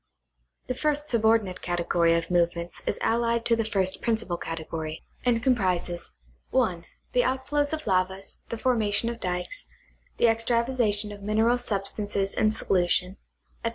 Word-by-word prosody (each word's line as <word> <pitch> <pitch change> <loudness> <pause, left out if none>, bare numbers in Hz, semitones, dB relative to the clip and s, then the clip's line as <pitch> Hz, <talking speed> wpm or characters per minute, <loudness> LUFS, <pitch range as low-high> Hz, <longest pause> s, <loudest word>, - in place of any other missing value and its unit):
The - - -2
first 295 +2 -1
subordinate 220 -5 +2
category 170 -1 +2
of 170 +1 -2
movements 170 -1 0
is - - 0
allied 235 0 +1
to 230 - +3
the 225 - 0
first 195 -4 0
principal 220 -6 0
category, 160 -1 -5 0.2
and 235 -2 +2
comprises, 180 - 0 0.3
(1) 185 -10 +1 0.3
the 250 - +4
outflows 280 +3 0
of 315 -1 -4
lavas, 190 0 -1
the 230 - -3
formation 225 -2 +2
of 235 0 -5
dykes, 180 - -2 0.5
the - - +3
extravasation 230 -2 +2
of 205 -1 -9
mineral 220 +4 +2
substances 200 -2 -2
in 215 - +3
solution, 180 -2 +1 0.5
etc. 230 - +1
215 Hz, 140 wpm, -26 LUFS, 180-235 Hz, 0.5 s, the